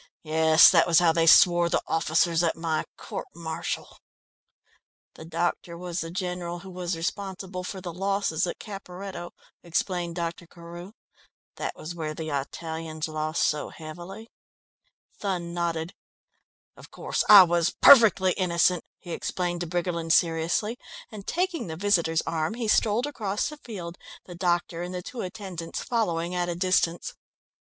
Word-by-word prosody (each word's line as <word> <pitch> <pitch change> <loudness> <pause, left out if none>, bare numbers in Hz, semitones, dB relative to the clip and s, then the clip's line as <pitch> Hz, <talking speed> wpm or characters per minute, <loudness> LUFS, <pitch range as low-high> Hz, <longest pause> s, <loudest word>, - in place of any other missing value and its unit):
Yes, 160 +1 +6
that 170 -2 +4
was 170 -2 +4
how 175 -2 +5
they 165 0 +2
swore 175 +1 +6
the - - 0
officers 165 +1 +2
at 170 -2 +1
my 165 -2 -2
court - - -6
martial." 160 -1 -5 1.1
"The 160 - -11
doctor 170 +1 -2
was 175 0 -4
the 165 - -5
general 180 -1 -4
who 190 0 -10
was 180 -1 -3
responsible 185 +1 -4
for 190 +1 -6
the 175 -2 -6
losses 195 -2 0
at - - -4
Caperetto," 195 -3 -8 0.3
explained 175 0 -2
Dr. 170 0 -4
Carew. 170 +3 -11 0.6
"That - - -4
was 160 +3 -7
where 155 -2 -4
the 160 -1 -5
Italians 160 +2 -4
lost 155 0 -1
so 150 -1 0
heavily." 175 +8 -10 0.9
Thun 180 -4 -3
nodded. 170 0 -2 0.8
"Of - - -14
course, - - -2
I 205 -3 +12
was 175 -1 +2
perfectly 210 -8 +7
innocent," 180 -1 +1
he 175 - -10
explained 175 +1 -2
to 175 - -3
Briggerland 170 -1 -1
seriously, 170 +8 +1 0.3
and 205 -3 -10
taking 350 - -1
the 160 - -5
visitor's 170 -4 +1
arm 160 +5 -2
he 235 -2 -3
strolled 215 +3 +2
across 215 -8 -2
the 300 - -9
field, 180 -11 -8 0.3
the 180 - -10
doctor 175 -1 -1
and 180 +1 -5
the 180 - -5
two 240 +4 -6
attendants 180 -3 -6
following 175 -7 -1
at 175 -1 -1
a 175 - -2
distance. 175 -1 0
175 Hz, 150 wpm, -26 LUFS, 165-190 Hz, 1.1 s, I